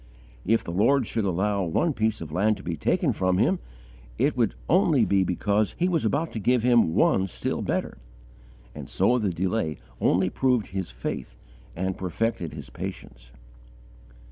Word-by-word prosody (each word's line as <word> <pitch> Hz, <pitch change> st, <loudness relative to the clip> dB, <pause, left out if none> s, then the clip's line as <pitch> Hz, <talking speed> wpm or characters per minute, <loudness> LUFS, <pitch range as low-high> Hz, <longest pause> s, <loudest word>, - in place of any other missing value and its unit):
If 115 Hz, +2 st, +3 dB
the -, -, -5 dB
Lord 120 Hz, +8 st, +3 dB
should 110 Hz, -1 st, -2 dB
allow 100 Hz, +2 st, 0 dB
one 120 Hz, -, +1 dB
piece 110 Hz, -4 st, -1 dB
of 80 Hz, -2 st, -7 dB
land 105 Hz, +6 st, +2 dB
to 95 Hz, -, -12 dB
be 85 Hz, -1 st, -3 dB
taken 75 Hz, -, +1 dB
from 95 Hz, -1 st, +1 dB
him, -, -, +2 dB, 0.6 s
it -, -, +1 dB
would -, -, +1 dB
only -, -, +4 dB
be 100 Hz, -1 st, +3 dB
because 100 Hz, +4 st, 0 dB
He 175 Hz, -, +2 dB
was 165 Hz, -8 st, 0 dB
about 150 Hz, +8 st, 0 dB
to 110 Hz, -, -4 dB
give 120 Hz, +3 st, +2 dB
him 120 Hz, -9 st, +4 dB
one 95 Hz, 0 st, +3 dB
still -, -, -3 dB
better; -, -, -2 dB, 0.7 s
and -, -, -9 dB
so 125 Hz, +1 st, +2 dB
the 105 Hz, -3 st, 0 dB
delay 90 Hz, -2 st, -1 dB, 0.2 s
only 90 Hz, +1 st, +2 dB
proved 125 Hz, -5 st, +1 dB
his 95 Hz, -1 st, -4 dB
faith -, -, -6 dB, 0.4 s
and 95 Hz, +2 st, -3 dB
perfected 95 Hz, -2 st, -2 dB
his 75 Hz, -3 st, -9 dB
patience. -, -, -8 dB
100 Hz, 170 wpm, -26 LUFS, 85-115 Hz, 0.7 s, only